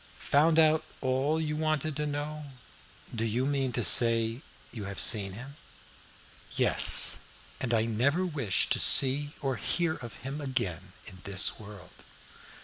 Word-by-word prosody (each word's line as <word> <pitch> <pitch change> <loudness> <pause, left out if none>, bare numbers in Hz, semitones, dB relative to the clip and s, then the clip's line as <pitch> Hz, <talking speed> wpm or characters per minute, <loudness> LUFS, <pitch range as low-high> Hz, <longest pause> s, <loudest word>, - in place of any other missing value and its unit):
"Found 155 +3 +3
out 155 -1 +3 0.2
all 135 +4 -2
you 150 -1 -4
wanted 155 -1 -3
to 150 0 -3
know? 150 +1 -6 0.7
Do 115 -1 -4
you 115 +3 -2
mean 135 -2 -2
to 120 - -1
say 115 +2 +3 0.3
you 110 -5 -8
have 100 -1 -8
seen 100 -3 0
him?" 135 +7 -11 1.0
"Yes, - - +5 0.4
and 125 - -4
I 110 -1 0
never 135 +11 -1
wish 135 - -1
to - - 0
see 145 +2 +5
or 135 -4 -3
hear 170 +5 -3
of 120 -5 -11
him 140 +3 -6
again 100 - -5
in 95 - -11
this 100 -1 0
world. 100 -3 -13
130 Hz, 145 wpm, -27 LUFS, 110-150 Hz, 1.0 s, Yes